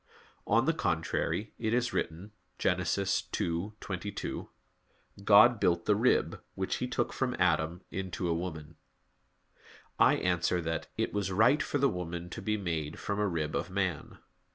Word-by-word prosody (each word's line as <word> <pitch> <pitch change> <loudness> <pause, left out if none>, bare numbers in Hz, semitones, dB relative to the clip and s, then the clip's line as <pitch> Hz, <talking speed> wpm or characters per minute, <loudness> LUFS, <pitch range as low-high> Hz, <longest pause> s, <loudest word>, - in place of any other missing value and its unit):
On 115 +4 +3
the 165 - +3
contrary, 90 - -1
It 110 0 +1
is 125 0 0
written 90 +6 -3 0.3
(Gen. 90 - +2
2:22): 95 +1 -2 0.7
"God - - +7
built 85 -1 +2
the 105 - +4
rib, 120 +5 +2
which 95 0 -1
He 125 - -2
took 125 - -1
from 130 -2 -1
Adam, 85 0 +1
into 95 -1 -3
a 85 - +2
woman." 80 -2 -5 1.2
I - - +6
answer 90 0 +1
that, 80 -2 -3
It - - -1
was 100 -2 -1
right 120 +10 +4
for 145 - -1
the 140 0 +4
woman 85 -3 -4
to - - -6
be 110 0 0
made 80 -6 -3
from 100 0 -3
a 105 - +2
rib 80 -4 -2
of - - -2
man. 95 -4 -2
90 Hz, 155 wpm, -31 LUFS, 85-105 Hz, 1.2 s, God